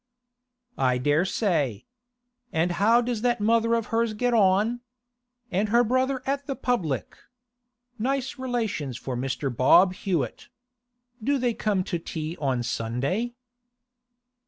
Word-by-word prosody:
'I 125 -1 +2
dare 145 +7 +2
say. 155 - 0 0.7
And 165 +2 +1
how 230 +4 +5
does 240 -2 -2
that 240 -1 +1
mother 230 +2 +3
of 230 -2 -1
hers 230 -1 +1
get 245 +3 0
on? 210 +3 +3 0.7
And 200 +3 0
her 235 +3 +5
brother 255 +2 0
at 280 +1 -2
the 275 - -2
public? 170 - -2 0.8
Nice 265 +3 -2
relations 225 - -2
for 130 0 -5
Mr. 130 0 -2
Bob 180 +9 +5
Hewett. 170 - -3 0.7
Do 280 +4 +2
they 245 -2 0
come 205 -4 0
to 175 - -3
tea 160 0 -5
on 130 -4 0
a - - -3
Sunday? 135 - -2
210 Hz, 135 wpm, -26 LUFS, 145-240 Hz, 0.8 s, how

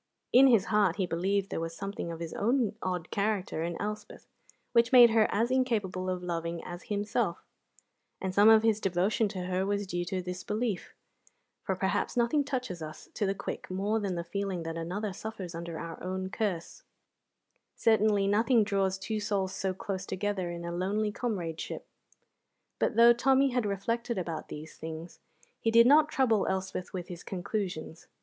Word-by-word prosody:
In 265 +2 +8
his 225 -7 +5
heart 200 -5 +4
he 190 - 0
believed 195 +3 -1
there - - -2
was 165 0 -4
something 195 -3 -5
of 165 - -7
his 165 -1 -5
own 235 -1 +1
odd 180 -2 -3
character 200 -5 -1
in 170 0 -3
Elspeth 210 0 -5 0.5
which 235 0 +4
made 240 -3 +9
her 220 -1 +4
as 230 +4 +1
incapable 210 -8 0
of 180 -1 -3
loving 170 -1 -3
as 175 0 -8
himself, 205 -2 -1 0.7
and 190 -1 -3
some 205 +3 +7
of 220 0 +7
his 220 -2 +3
devotion 195 +4 +1
to 190 -3 -5
her 185 +1 -1
was 205 +1 -1
due 175 -2 -2
to 185 +1 -2
this 180 0 -5
belief; 215 -2 -2 0.7
for - - -2
perhaps - - -1
nothing 245 +5 +3
touches 250 - -4
us 155 0 -8
to 205 - -1
the 195 - 0
quick - - -6
more 200 +4 0
than 195 -4 -2
the 170 - -3
feeling 190 0 -3
that 165 0 -4
another 185 +5 -3
suffers 195 -3 -6
under 165 0 -5
our 165 0 -7
own 185 +1 -3
curse; 185 -7 -3 0.9
certainly 215 -3 +3
nothing 225 +3 +4
draws 195 -2 0
two 215 +3 -3
souls 200 -3 -1
so 190 -1 -1
close 190 0 -5
together 190 -2 -2
in 170 0 -6
a 170 - -3
lonely 200 +5 0
comradeship. 180 -9 -4 0.9
But - - +1
though 235 +1 +8
Tommy 270 +3 +3
had 245 -4 0
reflected 230 +4 -2
about 170 -3 -4
these 155 +1 -9
things, 160 +2 -8 0.4
he 225 - +1
did 230 +1 +7
not 300 +4 +6
trouble 230 -8 +2
Elspeth 190 -1 -3
with 180 -2 -5
his 175 -2 -8
conclusions. 180 -4 -4
195 Hz, 175 wpm, -30 LUFS, 180-220 Hz, 0.9 s, made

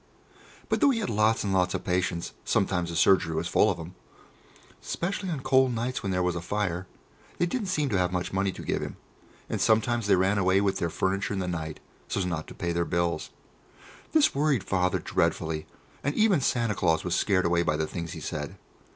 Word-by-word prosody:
But - - 0
though 285 - +6
he 260 - +2
had 215 - -2
lots 110 +1 +2
and 100 -2 -1
lots 90 0 +2
of 90 - -3
patients 90 -1 -1
sometimes 90 -3 +1
the 85 - -5
surgery 80 -2 +4
was 85 - -1
full 105 - +4
of 95 - -1
them, 85 +1 -8 0.9
'specially 190 +2 -3
on 155 -6 -3
cold 130 -1 +3
nights 120 +3 -2
when 100 - -2
there 90 -1 +1
was 90 -1 0
a 85 - -3
fire 95 -1 -2 0.5
they 175 - +2
didn't 205 +4 -2
seem 150 -5 0
to 100 - +1
have 90 -1 +1
much 90 0 -2
money 95 0 +1
to - - -9
give - - -1
him, - - -6 0.5
and - - -3
sometimes 110 0 +2
they 100 - +5
ran 95 +3 +2
away 95 0 +3
with 100 -1 0
their 85 - 0
furniture 100 +4 -1
in - - -2
the 90 - -2
night 80 -3 -4 0.3
so's 95 - -1
not 85 -3 -3
to - - -10
pay 85 - -2
their 85 0 +1
bills. 85 -2 -1 0.8
This 310 -2 +4
worried 140 -6 +1
Father 90 -2 +1
dreadfully, 80 -1 -1 0.4
and 145 +2 -1
even 215 -8 +4
Santa 120 -4 +1
Claus 80 -4 +1
was 90 - -2
scared 95 -1 +2
away 85 0 +3
by 75 -3 +1
the 80 - 0
things 85 +2 -5
he 80 - -8
said. - - -5
95 Hz, 215 wpm, -27 LUFS, 85-115 Hz, 0.9 s, though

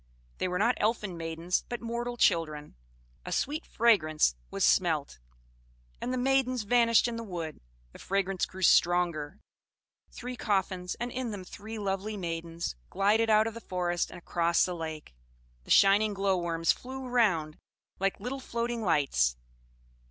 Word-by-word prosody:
They - - 0
were 180 0 -1
not 230 +6 +3
elfin 210 -4 0
maidens, 165 +2 -2
but 240 - -3
mortal 240 +1 -4
children. 155 -7 +1 0.5
A - - -7
sweet 300 +3 -1
fragrance 155 - +3 0.2
was - - +1
smelt, - - +1 0.8
and 250 - -2
the 255 - -1
maidens 255 -2 +1
vanished 230 +1 +4
in 235 -1 -4
the 230 - -5
wood; 170 -6 -6 0.3
the - - -14
fragrance 195 -1 -1
grew 190 0 -8
stronger 175 -2 +3 0.7
three 250 +1 -7
coffins, 190 -5 -1
and 240 +1 -4
in 255 -1 -3
them 205 -3 -6
three 215 +4 -8
lovely 205 +1 -3
maidens, 165 - -4
glided 210 +4 +2
out 215 0 +5
of 225 - -3
the 230 - -9
forest 175 -3 -1
and - - -10
across 170 0 +1
the 180 - -3
lake: 160 - -6 0.5
the - - -17
shining 205 +1 +5
glow 195 -1 +1
worms 165 -2 +1
flew 260 +1 -6
around 195 -12 +1 0.4
like 195 +1 0
little 250 +6 -4
floating 235 -2 -3
lights. 140 - +2
195 Hz, 150 wpm, -29 LUFS, 170-230 Hz, 0.8 s, out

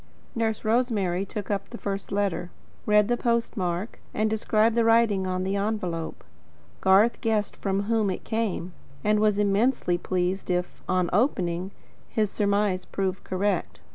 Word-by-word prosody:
Nurse 225 -2 -1
Rosemary 210 -6 +1
took 210 0 -5
up 200 -1 -2
the 235 - -7
first 200 -2 -4
letter, 195 -4 -1 0.4
read 210 -1 +5
the 240 - +2
postmark, 220 -6 -1 0.2
and 215 +1 +1
described 220 +1 +2
the 235 0 +3
writing 225 -4 +3
on 185 0 -1
the 190 +1 -1
envelope. 195 -6 -2 0.6
Garth 195 +5 +4
guessed 220 -3 0
from 195 0 -1
whom 220 -1 +1
it 185 - -3
came, 215 -6 -2 0.3
and 210 0 +3
was 210 -1 +3
immensely 205 -2 +2
pleased 185 +1 -1
if, 180 0 -2
on 185 -1 +2
opening, 185 -5 +1 0.4
his 215 -3 0
surmise 200 -2 +1
proved 190 -1 -3
correct. 185 -1 -1
200 Hz, 145 wpm, -26 LUFS, 185-220 Hz, 0.6 s, read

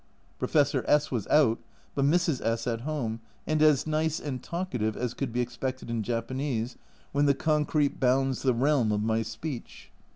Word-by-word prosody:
Professor 145 -2 +2
S 150 0 +3
was 115 -6 -2
out, 130 -7 +4 0.3
but 140 - +1
Mrs. 165 -2 +2
S 115 0 0
at 115 -2 -1
home, 125 -6 -2 0.3
and 155 0 +1
as 155 -3 +5
nice 155 0 0
and 130 -4 -4
talkative 125 - -2
as 125 -1 -2
could 135 -4 -3
be 125 +2 0
expected 125 0 -4
in 115 -1 -1
Japanese, 120 +1 -2 0.4
when 145 +1 +2
the 140 - +4
concrete 150 -1 +1
bounds 130 0 +2
the 130 -3 +2
realm 130 -3 +2
of 105 0 0
my 110 +1 +1
speech. 120 +4 -7
130 Hz, 170 wpm, -28 LUFS, 115-150 Hz, 0.4 s, as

